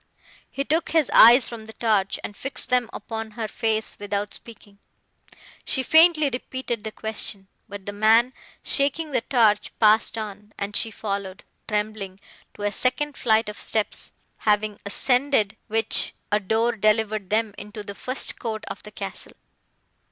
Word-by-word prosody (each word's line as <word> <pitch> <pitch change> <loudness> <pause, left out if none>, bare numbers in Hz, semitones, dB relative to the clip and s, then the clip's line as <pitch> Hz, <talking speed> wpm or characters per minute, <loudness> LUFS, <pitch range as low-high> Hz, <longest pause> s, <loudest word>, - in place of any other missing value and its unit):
He 275 - -3
took 320 +4 0
his 315 -4 +2
eyes 240 +3 +8
from 225 -2 -9
the 220 - -10
torch, 210 -4 +1
and 205 - -6
fixed 270 +6 -5
them 250 -2 +2
upon 225 +1 -5
her 225 -2 -2
face 220 0 -2
without 205 0 -3
speaking. 205 -3 -13 0.8
She 260 - -1
faintly 320 0 +5
repeated 245 -2 -4
the 220 - -5
question, 210 -3 -1 0.2
but 200 -1 -8
the 205 - -5
man, 225 +4 +4 0.3
shaking 290 +3 0
the 260 - +1
torch, 220 -5 +2
passed 220 +1 +4
on; 210 -1 -7
and 200 +1 -4
she 225 - +1
followed, 200 -3 -5 0.2
trembling, 210 -2 -3 0.4
to 205 - -8
a 205 - +1
second 255 +7 0
flight 220 -1 +2
of 210 - -6
steps, 220 -2 -2 0.2
having 210 0 0
ascended 245 -1 +2
which, 225 0 +2 0.2
a 210 - +3
door 220 +4 +1
delivered 215 -2 +1
them 215 0 +1
into 210 +1 -8
the 200 - -7
first 255 +6 -3
court 220 -3 -4
of - - -7
the 210 - -11
castle. 195 -2 -6
220 Hz, 155 wpm, -24 LUFS, 205-240 Hz, 0.8 s, eyes